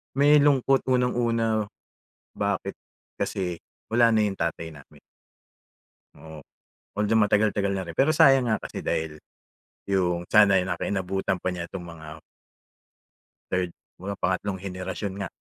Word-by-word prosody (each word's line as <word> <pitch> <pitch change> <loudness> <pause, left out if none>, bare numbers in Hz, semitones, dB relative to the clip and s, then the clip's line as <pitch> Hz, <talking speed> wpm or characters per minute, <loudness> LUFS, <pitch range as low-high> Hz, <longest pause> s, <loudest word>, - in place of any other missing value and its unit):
May 145 +2 +6
lungkot 135 -2 +3
unang-una, 115 -4 +1 0.7
bakit? - - -2 0.4
Kasi 90 -3 -2 0.3
wala 115 +1 +4
na 110 - +3
yung 100 -1 -3
tatay 85 -1 -3
namin. 75 -2 -16 1.2
Oo. 80 +1 -11 0.6
Although, 105 +2 +1
matagal 105 0 +2
tagal 100 -1 0
na 95 -1 -3
rin 85 - -7
pero 140 - +3
sayang 135 -6 +5
nga 110 - +2
kasi - - -7
dahil, 80 -1 -2 0.8
yung 90 -2 0
sana 105 -3 +6
naka 90 -1 -3
inabutan 95 -1 -1
pa - - -1
niya 90 -2 -5
itong 95 - -6
mga 80 -2 -11 1.5
3rd, 90 -1 0 0.3
mga 100 +2 -5
pangatlong 95 +1 -1
henerasyon 95 +1 -5
nga. 90 - -5
100 Hz, 130 wpm, -25 LUFS, 90-115 Hz, 1.5 s, May